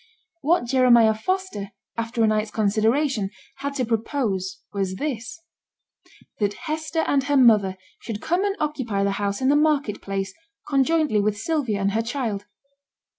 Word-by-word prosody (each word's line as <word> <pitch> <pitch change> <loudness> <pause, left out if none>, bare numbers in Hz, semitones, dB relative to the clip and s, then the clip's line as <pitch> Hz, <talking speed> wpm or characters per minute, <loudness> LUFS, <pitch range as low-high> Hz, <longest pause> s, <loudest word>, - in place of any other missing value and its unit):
What 320 -1 +2
Jeremiah 240 -3 +5
Foster, 220 - -3 0.2
after 230 0 -1
a - - +5
night's 215 0 +1
consideration, 220 +2 +1 0.3
had 280 +1 -4
to 255 -3 0
propose 220 -5 -1 0.2
was 195 -2 -1
this; 250 +3 -4 1.0
that 205 -1 0
Hester 315 +1 -1
and 275 -2 +1
her 285 0 +2
mother 210 -7 +5 0.2
should 220 -3 -5
come 350 - 0
and 400 -1 0
occupy 260 -10 -1
the 200 - +1
house 200 +3 -1
in 260 - +3
the 285 - +5
market 295 -8 +1
place, 195 -1 -3 0.3
conjointly 285 -4 +2
with 210 0 0
Sylvia 250 -4 -1
and 200 0 +1
her 220 +2 +1
child. 230 -4 -3
230 Hz, 150 wpm, -24 LUFS, 205-285 Hz, 1.0 s, Jeremiah